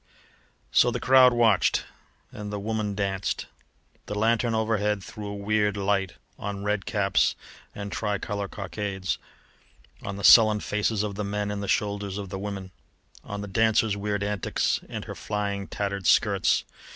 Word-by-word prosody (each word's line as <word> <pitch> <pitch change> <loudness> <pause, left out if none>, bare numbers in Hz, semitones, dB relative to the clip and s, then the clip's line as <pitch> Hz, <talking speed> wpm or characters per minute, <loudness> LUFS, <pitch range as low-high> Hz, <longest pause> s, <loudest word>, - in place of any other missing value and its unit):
So - - +5
the - - -2
crowd 130 -1 +6
watched, 115 -5 +3 0.5
and 105 0 -7
the 105 - -3
woman 105 -1 -2
danced. 95 -2 -2 0.6
The 105 - -4
lanthorn 115 +2 +2
overhead 105 -2 0
threw 105 +1 -8
a 100 - -5
weird 105 0 0
light 100 -1 0 0.3
on 100 -1 -4
red 105 -1 -1
caps 100 -2 +2 0.4
and 100 0 -6
tricolour 105 -1 -2
cockades, 95 0 -4 0.8
on 100 - -5
the 100 - -7
sullen 110 -2 +8
faces 105 0 0
of 105 -1 -3
the 105 +2 -4
men 105 0 -2
and 100 0 -3
the 100 - -4
shoulders 100 -1 -1
of 100 -2 -5
the 95 - -5
women, 100 -2 -5 0.5
on 100 0 -6
the 105 - -5
dancer's 110 +1 +2
weird 105 0 -2
antics 105 -2 0
and - - -5
her - - -6
flying, 100 -1 -3
tattered 100 -3 -3
skirts. - - +3
105 Hz, 155 wpm, -26 LUFS, 100-105 Hz, 0.8 s, sullen